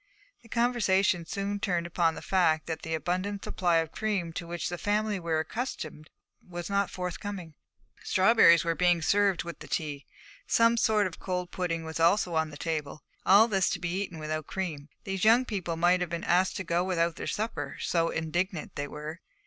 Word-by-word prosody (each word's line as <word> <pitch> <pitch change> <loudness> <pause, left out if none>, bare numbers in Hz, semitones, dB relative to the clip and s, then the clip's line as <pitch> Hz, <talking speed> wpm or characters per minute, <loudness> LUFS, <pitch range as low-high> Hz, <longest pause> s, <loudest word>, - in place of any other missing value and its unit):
The 230 - -19
conversation 200 -8 +2
soon 200 0 -3
turned 175 -4 -1
upon 170 -1 +1
the - - -8
fact 160 -5 +2
that 160 -1 -4
the 160 0 -2
abundant 185 +5 -2
supply 175 -2 0
of 165 -1 0
cream 195 -6 -2
to 170 - -5
which 170 -1 -3
the 175 0 -5
family 210 -1 0
were 165 -2 0
accustomed 160 - -5 0.3
was 175 +1 -7
not 200 -1 +1
forthcoming. 180 -1 -5 0.5
Strawberries 190 -4 +5
were 165 - +1
being 175 -1 +2
served 200 +1 +2
with 170 0 -8
the - - -10
tea; 145 -4 -3 0.4
some 230 0 +4
sort 220 -2 +3
of 185 - -5
cold 180 -1 -3
pudding 165 -3 -2
was 160 0 -5
also 175 +2 +3
on 160 -1 +1
the 145 - -10
table; 150 -3 -4 0.2
and - - +2
all 210 +4 +8
this 195 -4 +2
to - - -2
be 180 +2 -2
eaten 185 -4 -5
without 155 0 -4
cream, 155 -6 -4
these 195 -1 -3
young 230 +4 +5
people 180 -7 -3
might 175 +2 +3
have 180 - -1
been 170 0 -4
asked 180 +2 +2
to 190 - -3
go 170 0 0
without 170 -3 0
their - - -5
supper, 220 +2 -3
so 165 -1 +1
indignant 170 +2 -2
they 145 - -3
were. 150 +3 -7
175 Hz, 195 wpm, -29 LUFS, 165-200 Hz, 0.5 s, all